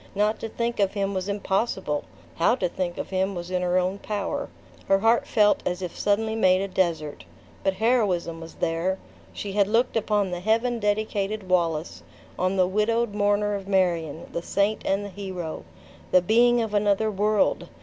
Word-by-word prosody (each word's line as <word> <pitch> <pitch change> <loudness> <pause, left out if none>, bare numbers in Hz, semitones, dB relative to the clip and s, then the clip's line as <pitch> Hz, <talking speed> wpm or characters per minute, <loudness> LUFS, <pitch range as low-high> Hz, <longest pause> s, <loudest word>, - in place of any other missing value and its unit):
Not 210 +2 +1
to 225 - -5
think 235 +1 -2
of 195 -1 +2
him 200 -1 -1
was 190 +1 -3
impossible; 190 -6 -1 0.3
how 170 +8 +3
to 190 -8 0
think 175 0 -3
of - - -5
him 190 +1 0
was 175 +1 -6
in 180 -1 0
her 180 0 +1
own 185 +2 0
power. 205 -1 -3 0.4
Her 195 - +5
heart 225 +4 +2
felt 210 -1 +3
as 180 +1 -2
if 180 - -5
suddenly 220 +2 0
made 185 -4 +4
a 195 - -1
desert. 170 -6 -1 0.4
But 195 - +1
heroism 190 -7 +1
was 165 - -10
there. 170 +3 -1 0.3
She 200 - -5
had 200 0 +2
looked 230 +4 +1
upon 210 -3 +1
the 175 - -3
Heaven 230 +5 +1
dedicated 210 -1 -1
Wallace; 165 -3 0 0.4
on 185 +1 +1
the 185 -1 +4
widowed 215 +3 +1
mourner 205 0 +1
of 195 -1 -5
Marion; 170 -5 0
the 170 - -2
saint 200 +4 0
and 195 +1 +1
the - - -6
hero; 185 -4 -6 0.4
the 185 - +4
being 240 +4 +4
of 220 -2 -5
another 205 +1 +2
world! 210 +1 +1
195 Hz, 180 wpm, -25 LUFS, 180-215 Hz, 0.4 s, Her